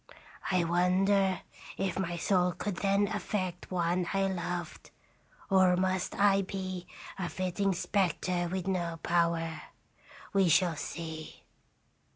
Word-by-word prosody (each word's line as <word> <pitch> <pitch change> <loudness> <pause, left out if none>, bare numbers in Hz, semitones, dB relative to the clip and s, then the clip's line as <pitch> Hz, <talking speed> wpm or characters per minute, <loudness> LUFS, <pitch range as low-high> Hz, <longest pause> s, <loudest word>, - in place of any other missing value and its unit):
I 185 -2 +3
wonder 185 +2 +2 0.4
if 190 -1 -1
my 175 -2 -2
soul 180 0 +2
could 180 +2 -4
then 200 +1 +2
affect 185 -4 -3
one 175 0 0
I 195 0 +2
loved, 175 -2 -4 0.6
or 185 -2 +4
must 185 0 0
I 200 -1 +4
be 185 -2 -5 0.3
a 175 -2 -2
flitting 185 +1 0
spectre 180 -1 0
with 185 -1 -2
no 175 -3 -1
power. 165 -2 +1 0.7
We 195 -3 +4
shall 170 +1 +4
see.' 160 0 -6
180 Hz, 120 wpm, -30 LUFS, 175-195 Hz, 0.7 s, or